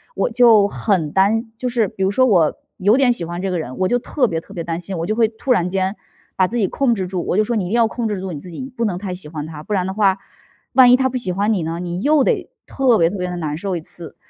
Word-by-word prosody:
我 - - 0
就 225 -4 +5
很 185 -8 -1
担 220 +5 +1
就 250 +2 -3
是 235 -4 +1
比 195 - -10
如 190 - +2
说 255 +5 +3
我 175 -10 +3 0.2
有 205 +4 +3
点 260 -3 +4
喜 175 -8 -3
欢 175 +2 -5
这 195 - -2
个 180 - -1
人， 130 -4 -6
我 185 - +2
就 245 +2 +2
特 255 +1 0
别 165 - -2
特 200 - -15
别 170 - -4
担 165 0 -3
心， 180 0 -6
我 165 - -2
就 215 - -1
会 225 -1 +3
突 225 +4 -4
然 180 -7 +2
间 190 +1 -1 0.4
把 185 -1 +3
自 240 - -4
己 205 -5 +2
控 260 -4 +1
制 190 -3 -3
住。 180 -2 -3
我 185 - 0
就 215 - +4
说： 235 - -2
“你 195 - -1
一 - - -6
定 220 - 0
要 230 -1 +4
控 230 0 -3
制 205 -3 -3
住 185 -1 -5
你 150 - -6
自 180 - -11
己， 170 - -7 0.2
不 230 - 0
能 180 -4 -1
太 190 -1 -5
喜 180 -4 -5
欢 150 -2 -5
他， 155 -2 -8
不 210 - -11
然 185 -2 +1
的 190 - -3
话， 195 -2 +2 0.6
万 250 -2 +7
一 - - +8
他 260 0 +1
不 255 - -7
喜 190 -7 -2
欢 205 +4 +1
你 185 - -1
呢， 165 +2 -4
你 175 0 -4
又 295 +2 +3
得 - - 0 0.2
特 260 -4 +2
别 165 - +4
特 200 - -5
别 180 - -2
地 180 - -5
难 150 -3 -3
受 190 +2 -3
一 170 - -4
次。” 170 0 -11
195 Hz, 335 characters per minute, -19 LUFS, 175-230 Hz, 0.6 s, 一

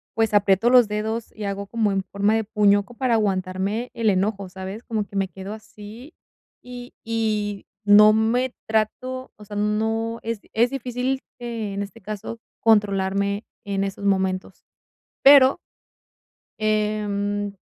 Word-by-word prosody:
pues 225 -1 +1
aprieto 205 +2 +4
los 245 -3 +6
dedos 220 +2 -3
y 210 -1 -5
hago 200 0 -4
como 220 -2 0
en 195 -1 0
forma 200 +3 0
de 225 - +1
puño 205 -1 +3
como 240 +1 -16
para 255 -2 +1
aguantarme 195 +3 -1
el 225 -2 +1
enojo, 195 0 0
¿sabes? 190 +4 -7
Como 215 -3 -2
que 200 - -14
me 195 -1 +1
quedo 195 +2 -8
así, 220 +6 -12 0.5
y 245 0 -10
y 215 -3 -1 0.2
no 210 +1 +8
me 240 +4 +1
trato 255 +4 -2
o 210 - -13
sea, 205 - -9
no 220 +2 -1
es 230 -2 -3
es 235 +2 +3
difícil, 255 0 -2 0.2
en 220 -4 -4
este 205 +3 -11
caso, 215 +3 -6 0.2
controlarme 200 -1 +2 0.2
en 195 -1 -1
esos 195 +1 -6
momentos, 190 -1 -1 0.6
pero 275 -1 +8 1.0
Em, 205 -1 -1
210 Hz, 145 wpm, -23 LUFS, 200-230 Hz, 1.0 s, no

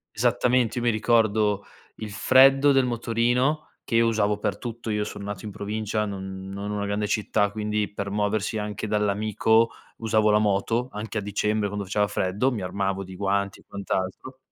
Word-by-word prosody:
Esattamente. 125 -2 +2
Io 120 - -1
mi 120 - +3
ricordo 110 -2 +2 0.3
il 110 -2 -7
freddo 135 +5 +5
del 135 -2 +4
motorino 120 +5 0
che 115 - -3
io 115 0 +5
usavo 105 -2 +1
per 100 -1 -2
tutto. 115 -2 -5
Io 105 0 0
son 105 - -7
nato 100 -1 -6
in 105 - -5
provincia, 105 +1 -2
non 95 -1 -6
non 100 +1 -5
una 105 -1 -2
grande 105 +1 -1
città, 105 -1 +1
quindi 105 0 -2
per 100 -1 -4
muoversi 105 +1 -1
anche 105 0 -4
dall'amico 105 +2 +2 0.3
usavo 110 -1 +2
la 105 - +5
moto, 110 +4 +1
anche 105 +1 -5
a - - 0
dicembre 105 +1 0
quando 100 0 -4
faceva 105 +2 +1
freddo, 100 +6 0
mi 110 -5 -3
armavo 95 +1 -2
di 95 0 -10
guanti 100 0 -1
e - - -25
quant'altro. 100 +6 -4
105 Hz, 180 wpm, -25 LUFS, 100-115 Hz, 0.3 s, freddo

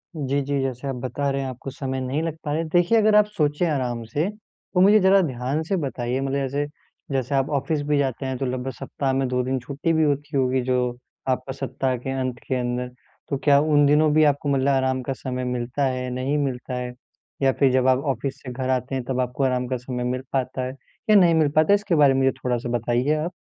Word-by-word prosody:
जी, 140 -2 -1
जी। 140 0 -1
जैसे 135 0 -3
आप 135 - -2
बता 140 +2 -2
रहे 135 - -1
हैं 135 - -3
आपको 130 +2 -7
समय 130 0 -4
नहीं 130 +4 -1
लग 165 -2 -2
पा 145 - -3
रहा 150 - 0
है। 165 - -4
देखिए 175 +6 +3
अगर 215 -1 +4
आप 210 0 +7
सोचे 150 +2 +1
आराम 125 -5 -1
से 145 +10 -1
तो 210 -3 -7
मुझे 210 +3 +7
ज़रा 190 +1 +5
ध्यान 135 -1 -2
से 180 +5 -1
बताइए 130 -4 -2
मतलब 135 0 -2
जैसे, 140 +1 -1 0.5
जैसे 135 0 -1
आप 135 0 +1
ऑफ़िस 155 +1 -2
भी 150 - +2
जाते 135 -1 -1
हैं 130 -1 -2
तो 135 - -2
लगभग 130 +1 -3
सप्ताह 135 -2 -2
में 135 0 +1
2 125 0 0
दिन 130 +1 -1
छुट्टी 145 +6 -2
भी 160 - +3
होती 145 0 0
होगी 130 0 +2
जो 130 0 +1 0.5
आपका 130 +1 -1
सप्ताह 135 -1 -2
के 125 +3 -6
अंत 130 -1 -2
के 130 - 0
अंदर। 125 0 -2 0.4
तो 140 - 0
क्या 140 -1 +6
उन 150 -1 +4
दिनों 150 +2 +4
भी 155 +1 +5
आपको 145 -1 +2
मतलब 135 0 +2
आराम 130 -1 +1
का 135 - -2
समय 130 -1 -4
मिलता 125 +2 -2
है, 130 -1 -2
नहीं 130 +4 -1
मिलता 130 -3 -2
है? 125 0 -4 0.5
या 135 -1 +4
फिर 135 -2 +5
जब 130 0 +2
आप 130 0 +4
ऑफ़िस 135 0 -5
से 125 - -6
घर 130 +1 -3
आते 130 +1 -1
हैं 130 - -2
तब 130 -1 -1
आपको 125 +2 -2
आराम 125 -1 +1
का 130 0 -1
समय 125 0 -5
मिल 125 +1 -1
पाता 130 -1 -1
है 130 - -4 0.4
या 215 - +7
नहीं 175 -4 +6
मिल 155 -2 +3
पाता 155 +4 +4
है? - - +8
इसके 205 -4 0
बारे 145 -3 +5
में 135 - +1
मुझे 135 0 +4
थोड़ा-सा 125 0 -1
बताइए 120 +5 +1
आप। 155 +4 -2
135 Hz, 245 wpm, -23 LUFS, 130-145 Hz, 0.5 s, है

